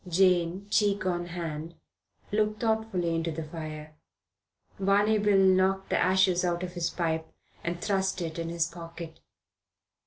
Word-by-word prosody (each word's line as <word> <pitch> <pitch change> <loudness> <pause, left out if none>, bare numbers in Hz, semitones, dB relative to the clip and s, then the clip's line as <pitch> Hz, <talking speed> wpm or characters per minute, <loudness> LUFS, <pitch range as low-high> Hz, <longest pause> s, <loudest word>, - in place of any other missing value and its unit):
Jane, 180 +1 +2
cheek 205 -2 +2
on 175 -1 -1
hand, 165 -1 -5 0.6
looked 215 0 +1
thoughtfully 220 -7 0
into 165 0 -1
the 160 +1 -4
fire. 155 -1 -7 0.9
Barney 205 +2 +3
Bill 205 -1 +3
knocked' 190 0 +3
the - - +3
ashes 185 -1 +3
out 175 0 0
of 180 -1 -5
his 175 -2 -1
pipe 160 -2 -2 0.3
and 170 0 -2
thrust 190 0 0
it 165 -1 -4
in 165 0 -3
his 170 -1 +1
pocket. 165 -1 -9
175 Hz, 145 wpm, -28 LUFS, 165-195 Hz, 0.9 s, Barney